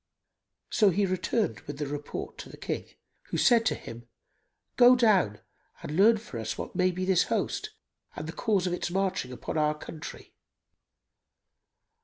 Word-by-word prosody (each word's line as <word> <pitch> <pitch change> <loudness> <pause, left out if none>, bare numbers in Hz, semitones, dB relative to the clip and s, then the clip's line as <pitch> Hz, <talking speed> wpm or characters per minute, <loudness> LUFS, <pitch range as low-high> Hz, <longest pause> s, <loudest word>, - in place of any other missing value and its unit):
So 210 -3 +5
he 200 +2 +2
returned 185 - -1
with 145 -1 -6
the 150 - -2
report 145 +1 -6
to - - -8
the - - -11
King, - - -4 0.4
who - - -2
said 230 -3 +4
to - - +1
him, 120 +1 -10 0.7
"Go 250 0 +8
down 195 - +3 0.4
and 150 - -4
learn 220 +5 +6
for 210 - -8
us 110 - -4
what - - -6
may 185 0 +3
be 185 +1 -3
this 190 -2 +3
host - - -1 0.5
and - - -5
the 160 - -5
cause 200 -4 +1
of 180 - 0
its 175 - -2
marching 185 -8 -1
upon 125 +5 -4
our 150 0 +1
country. 155 0 -9
180 Hz, 165 wpm, -28 LUFS, 150-205 Hz, 0.7 s, Go